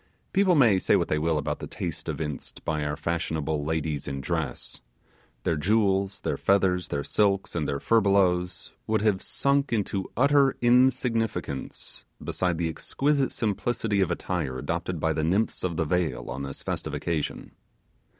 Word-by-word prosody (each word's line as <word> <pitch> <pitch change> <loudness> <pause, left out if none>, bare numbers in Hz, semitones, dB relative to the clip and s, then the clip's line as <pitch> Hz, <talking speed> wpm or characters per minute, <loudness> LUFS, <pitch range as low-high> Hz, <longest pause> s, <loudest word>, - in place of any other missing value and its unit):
People 190 -2 +4
may 115 -10 +5
say - - +3
what - - +1
they 75 - +1
will 80 0 +1
about 75 - -2
the - - -6
taste - - -5
evinced 75 -3 -5
by 75 -1 -1
our 75 0 -1
fashionable 80 -2 -2
ladies 80 -2 -2
in 70 0 -3
dress. 80 0 -3 0.6
Their 80 - +1
jewels, 100 +2 +1
their - - -1
feathers, 95 -3 +2
their 70 0 -2
silks, 100 +1 +1
and 80 -4 -1
their 70 - -1
furbelows, 95 -5 +2
would 110 -1 +1
have 105 -4 +2
sunk 140 -1 +1
into 100 -3 -1
utter 140 +1 +4
insignificance 120 - +1 0.2
beside 90 -2 -1
the 85 0 0
exquisite 140 - 0
simplicity 110 -1 0
of 95 - +2
attire 85 -6 -2
adopted - - -3
by 80 0 +1
the 80 - -1
nymphs 95 +7 0
of 85 -3 -1
the 80 - +1
vale 90 +1 -1
on 65 - -4
this 70 -1 -6
festive - - -3
occasion. 80 -4 -3
90 Hz, 160 wpm, -27 LUFS, 80-110 Hz, 0.6 s, may